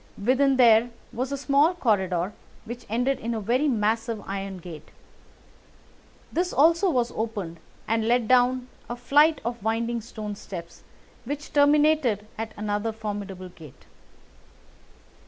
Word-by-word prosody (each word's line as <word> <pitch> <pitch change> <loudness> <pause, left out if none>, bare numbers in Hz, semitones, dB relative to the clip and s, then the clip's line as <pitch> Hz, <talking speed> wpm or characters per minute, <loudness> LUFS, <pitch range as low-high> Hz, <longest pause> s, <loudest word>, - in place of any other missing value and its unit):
Within 260 +5 +2
there 235 -1 +6 0.2
was 255 +3 -3
a 280 - -1
small 285 +5 +3
corridor, 190 - 0 0.3
which 240 +1 -8
ended 245 +4 0
in 230 0 -3
a - - -2
very 245 +8 +1
massive 225 -1 0
iron 195 -1 -5
gate. 165 -3 -10 1.4
This 355 +2 0
also 335 +6 +4
was 245 -6 +1
opened, 205 -7 -4 0.3
and 225 0 0
led 240 -1 +2
down 255 0 +3 0.2
a 240 - -3
flight 290 +5 +4
of 235 -1 -3
winding 230 +2 -1
stone 215 -2 -6
steps, 170 -4 -9 0.4
which 290 +5 -6
terminated 290 -6 +3
at 225 0 -5
another 210 +1 -1
formidable 205 -4 -6
gate. 155 -6 -15
230 Hz, 130 wpm, -25 LUFS, 210-265 Hz, 1.4 s, there